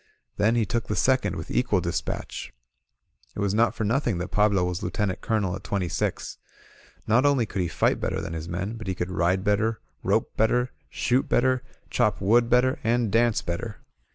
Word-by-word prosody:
Then 110 +3 +3
he 115 -2 +2
took 115 +3 -2
the - - -1
second 130 0 +2
with - - -7
equal 120 -6 +2
dispatch. 85 -1 -4 0.8
It - - -6
was 100 -1 0
not 115 +2 +2
for 110 - -2
nqthing 115 -2 +1
that 90 +2 -4
Pablo 105 -3 +3
was 90 0 -3
Lieutenant 95 +1 -2
Colonel 105 -5 0
at 100 - -9
twenty 95 -3 -1
six. 85 - -3 0.7
Not 115 +4 +3
only 140 -5 +3
could 100 -2 -3
he 90 - 0
iSght - - +1
better - - -2
than 85 - -5
his 80 +1 -5
men, 95 +6 -3
but 110 -3 -8
he 95 - -1
could 90 +1 -3
ride 95 +1 +1
better, 110 +2 +1 0.2
rope - - 0
better, 125 +3 +2 0.2
shoot 125 +2 0
better, 130 0 +2 0.3
chop 105 0 +1
wood 115 +4 +3
better, 125 +1 +3
and 115 -1 +1
dance 115 0 +2
better. 100 +6 -4
105 Hz, 190 wpm, -26 LUFS, 95-120 Hz, 0.8 s, Then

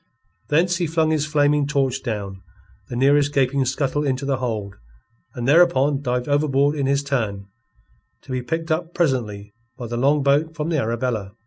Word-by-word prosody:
Thence 170 +4 +2
he 175 -2 -1
flung 160 0 +1
his 155 -1 0
flaming 145 -1 +2
torch 135 -3 0
down 100 -5 -5 0.5
the - - -5
nearest 140 +3 +3
gaping 135 -1 +1
scuttle 135 +2 -1
into 135 -1 -1
the 135 -1 0
hold, 110 -6 -3 0.6
and 120 -1 -3
thereupon 145 -3 +4
dived 125 -2 -2
overboard 145 0 +2
in 140 -2 -1
his 140 +1 +1
turn, 110 -8 -2 0.8
to - - -11
be 130 -1 -1
picked 165 +5 -3
up 165 +2 -2
presently 105 - -1 0.2
by 125 - -6
the 120 +1 -4
longboat 145 +4 +2
from 155 0 -3
the 160 -3 +1
Arabella. 115 -4 -2
140 Hz, 170 wpm, -22 LUFS, 125-150 Hz, 0.8 s, thereupon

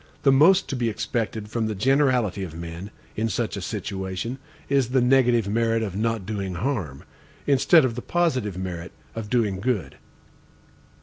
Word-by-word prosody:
The 135 - +6
most 165 +8 +5
to - - -2
be 120 -2 0
expected 110 -1 -3
from 110 0 -1
the 110 - -3
generality 125 -4 +2
of 80 -4 -7
men, 85 +3 -7 0.3
in 110 +1 0
such 100 - -2
a - - -5
situation, 95 +6 -4 0.3
is 135 -3 +2
the 130 +1 +3
negative 125 -3 +3
merit 115 +1 +1
of 100 -4 -4
not 110 -1 -1
doing 100 -3 -3
harm, 90 - -3 0.4
instead 140 +2 +5
of 125 - -1
the 125 - -5
positive 130 - 0
merit 90 -1 -5 0.2
of 110 -2 -6
doing 105 -6 +1
good. 100 - -2
115 Hz, 165 wpm, -24 LUFS, 95-130 Hz, 0.4 s, The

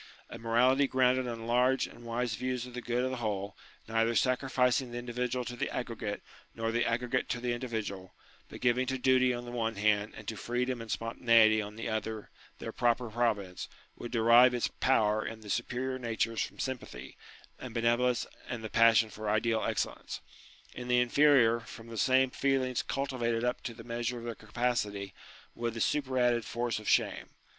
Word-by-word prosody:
A 115 - -7
morality 125 +5 +3
grounded 130 -1 +2
on 115 -1 -5
large 125 +3 +3
and 120 - -13
wise 120 0 -2
views 125 +1 -2
of 125 - -11
the 125 - -5
good 120 +1 -1
of 130 - -1
the 130 - -3
whole, 105 -3 -3 0.3
neither 115 +1 +1
sacrificing 125 0 +2
the 120 - -5
individual 125 +1 -2
to 120 +1 -5
the - - -2
aggregate 115 -4 -4 0.3
nor 115 0 -1
the 120 +1 +1
aggregate 120 +1 -1
to 120 - -1
the 120 0 -1
individual, 110 -6 -5 0.3
but - - -10
giving 125 +1 +2
to 130 0 -1
duty 130 0 +4
on 120 0 -4
the 120 - -7
one 115 -2 -1
hand 105 0 +1
and 110 - -11
to 110 - -3
freedom 120 +3 -2
and 115 - -9
spontaneity 115 -1 +4
on 105 0 -7
the 115 - -5
other 110 -1 -4 0.3
their - - -6
proper 120 -1 0
pro 120 +1 +3
vince, 95 -3 -8 0.3
would 120 - -8
derive 120 +2 +6
its 120 - 0
power 110 -4 +3
in 110 -1 -6
the 105 -2 -6
superior 130 +2 -2
natures 115 -1 -1
from - - -4
sympathy 120 - -5 0.4
and 125 -2 -8
benevolence 120 +1 +2 0.2
and 120 -2 -4
the 110 - -6
passion 115 -1 +5
for 105 +1 -5
ideal 110 +1 +1
excellence: - - -3 0.5
in 125 0 -7
the 125 0 +3
inferior, 125 -2 +4
from 115 0 -11
the 115 - -7
same 130 +3 +3
feelings 130 -2 0
cultivated 120 -4 -2
up 125 0 -1
to 115 - -6
the 115 - -10
measure 120 +1 -3
of 115 - -8
their 120 0 -4
capacity, 105 -3 -2 0.4
with 115 -1 -3
the - - -4
superadded 125 -3 +1
force 120 0 -2
of 110 - -4
shame. - - +1
120 Hz, 185 wpm, -31 LUFS, 115-125 Hz, 0.5 s, derive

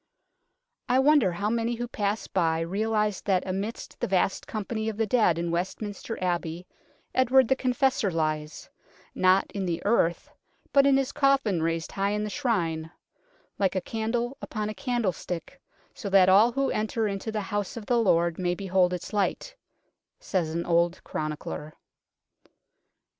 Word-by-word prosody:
I 250 - +4
wonder 270 -7 +4
how 205 +5 -1
many 235 +1 0
who 240 +1 -4
pass 205 -1 -2
by 165 -3 0
realize 210 +3 0
that 190 -3 +1
amidst 195 +4 -5
the - - -1
vast 190 0 0
company 220 +1 -3
of 215 - -6
the 225 - +1
dead 215 -6 +3
in 170 0 -2
West 175 +2 -2
minster 215 +2 -5
Abbey 175 -1 -2 0.5
Edward 260 0 +4
the 265 - +3
Confessor 265 -3 +1
lies, 155 -2 -2 0.5
not 185 +1 +3
in 200 - -3
the 170 -1 -1
earth, 200 -6 +1 0.4
but 275 0 +6
in 275 -1 +5
his 270 -1 0
coffin 275 - +2
raised 165 0 -1
high 195 0 0
in 210 0 -1
this 210 - -4
Shrine 170 - -1 0.4
" - - -37
like 195 -2 +1
a - - +2
candle 235 +6 -2
upon 215 -1 -3
a - - -4
candlestick, 235 +1 -3 0.3
so 205 - -6
that 190 -1 +6
all 210 +5 +6
who 275 +2 0
enter 215 +1 -1
into 200 +2 -3
the 215 -1 -2
House 205 +1 -3
of 220 - -7
the 240 +1 +2
Lord 170 -5 +2
may 180 -1 0
behold 185 -1 +1
its 180 - -6
light," 210 - -1 0.6
says 175 -4 -1
an 170 +2 -3
old 170 +1 +1
chronicler. 155 0 -5
205 Hz, 165 wpm, -27 LUFS, 175-235 Hz, 0.6 s, but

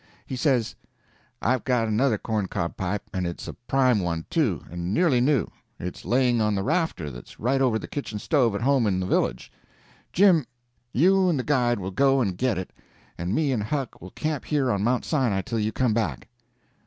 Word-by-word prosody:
He 130 - -5
says: 125 -3 +1 0.7
"I've 125 +2 +1
got 125 -3 +1
another 110 +2 +2
corn 105 -2 -2
cob 85 -2 -3
pipe, 95 +2 -2
and 90 -2 -1
it's 85 - -6
a - - -5
prime 125 -2 +2
one, 85 -3 -2
too, 120 - +1
and 85 +1 -4
nearly 155 -9 +3
new. 135 -1 +3 0.3
It's 90 0 -6
laying 120 +2 +2
on 105 -1 +1
the 95 - -1
rafter 150 - -1
that's - - -12
right 135 +4 +1
over 125 -4 +3
the - - -7
kitchen 135 -7 -5
stove 120 -2 +1
at 100 - -3
home 130 -2 +3
in 95 -2 +1
the 95 - -1
village. - - 0 0.6
Jim, 175 -7 +4 0.4
you 185 +6 +4
and 165 - +1
the 130 - -1
guide 125 -4 +2
will 95 0 -4
go 135 +6 +3
and 100 -8 0
get 120 +2 0
it, 95 - -5 0.4
and 90 +4 -2
me 150 -3 +1
and 120 -5 0
Huck 135 +4 -3
will 90 - -9
camp 155 - -3
here 140 -4 +1
on 100 -1 0
Mount 120 +2 +1
Sinai 125 -11 +1
till 115 +4 -2
you 110 0 0
come 120 0 +1
back." 90 - -2
120 Hz, 205 wpm, -25 LUFS, 100-135 Hz, 0.7 s, Jim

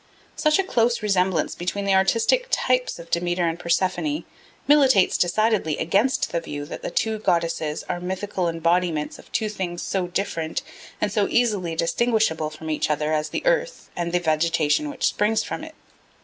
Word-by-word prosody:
Such 305 -1 +3
a 390 - +2
close 235 - +1
resemblance 185 -5 +1
between 190 +3 -3
the 195 - +2
artistic 230 - +3
types 255 0 +1
of 170 0 -12
Demeter 175 0 +1
and 165 +1 -2
Persephone 185 - 0 0.4
militates 270 -9 +5
decidedly 190 -3 +1
against 210 +10 +1
the 170 - 0
view 145 -3 -6
that 150 - -8
the - - -4
two 220 -1 -1
goddesses 165 -5 0
are 175 - -4
mythical 185 0 -2
embodiments 165 -1 0
of - - -16
two 220 - 0
things 185 -4 -4
so 185 -2 -1
different 170 -3 -2 0.4
and 210 - 0
so 205 -1 +1
easily 205 -9 +1
distinguishable 170 -3 +1
from 155 +1 -7
each 155 - -1
other 150 +1 0
as 155 0 0
the - - -4
earth - - 0
and 170 -1 -2
the 175 - +2
vegetation 160 - +1
which 290 - -2
springs 215 +1 +1
from - - -5
it. 315 0 -10
180 Hz, 170 wpm, -23 LUFS, 165-225 Hz, 0.4 s, militates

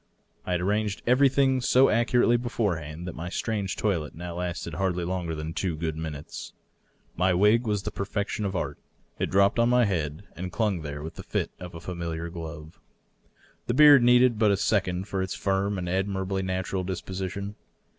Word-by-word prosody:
I 90 - 0
had 90 - 0
arranged 105 +1 -1
everything 130 +1 +4
so 130 +1 +5
accurately 120 +1 +3
beforehand 90 -10 -2
that 90 - -4
my 85 +2 -6
strange 100 -1 -2
toilet 85 -8 -1
now 85 +1 -6
lasted 90 -2 -4
hardly 90 0 -1
longer 90 -2 -2
than 80 +1 -5
two 90 -2 -1
good 80 -1 -2
minutes. 80 -2 -7 0.6
My 90 +1 +2
wig 105 +5 +4
was 105 -2 0
the 105 - -4
perfection 100 +1 -3
of 100 -1 -2
art; 75 -4 -3 0.4
it - - 0
dropped 100 +4 +3
on 115 0 +4
my 125 -1 +4
head 80 -4 -2
and 90 +1 -5
clung 105 -4 0
there 75 -1 -6
with 80 - -8
the - - -6
fit - - -2
of 90 -1 -8
a - - -6
^miliar 85 -1 -5
glove. 80 -2 -8 0.9
The 120 - 0
beard 145 -2 +8
needed 125 -1 +5
but 110 -2 +4
a 100 - +3
second 95 -2 0
for 95 -2 -2
its 95 -1 -3
firm 100 +1 0
and 90 -1 -3
ad 95 +3 0
mirably 95 -1 -2
natural 95 0 -2
disposition. 95 +2 -4
95 Hz, 185 wpm, -27 LUFS, 85-105 Hz, 0.9 s, beard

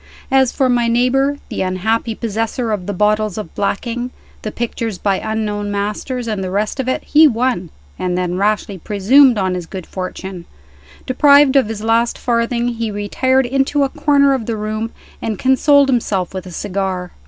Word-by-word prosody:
As 265 -2 +4
for 265 - +1
my 240 -2 +2
neighbor, 260 +4 +2
the - - -3
unhappy 220 +5 -1
possessor 225 +2 -2
of 200 -4 -3
the - - -1
bottles 210 +1 +1
of 210 -7 -6
blacking, 240 +4 -2 0.3
the 215 - -4
pictures 230 -3 -3
by 195 -1 0
unknown 210 -2 -3
masters, 210 +5 -3
and 210 -3 -2
the 185 - -3
rest 210 +7 -2
of 260 - -2
it, 260 - -1
he 310 +1 +6
won, 235 - -1 0.3
and 180 -1 -1
then 180 -1 -1
rashly 205 0 -1
presumed 230 - +4
on 190 -2 0
his 180 -2 -5
good 185 -2 -7
fortune. 185 -1 -6 0.6
Deprived 280 +1 +5
of 270 -5 +4
his 215 -1 -5
last 230 +1 +1
farthing, 235 0 0
he 230 -2 -3
retired 260 +6 +1
into 270 +3 +1
a 275 - 0
corner 285 -2 +3
of 250 -5 -3
the 230 -2 -2
room, 215 +1 -3 0.3
and 220 -3 -3
consoled 275 +3 +4
himself 200 -8 0
with 185 -1 -6
a - - -9
cigar. 185 -1 -3
225 Hz, 175 wpm, -17 LUFS, 200-255 Hz, 0.6 s, he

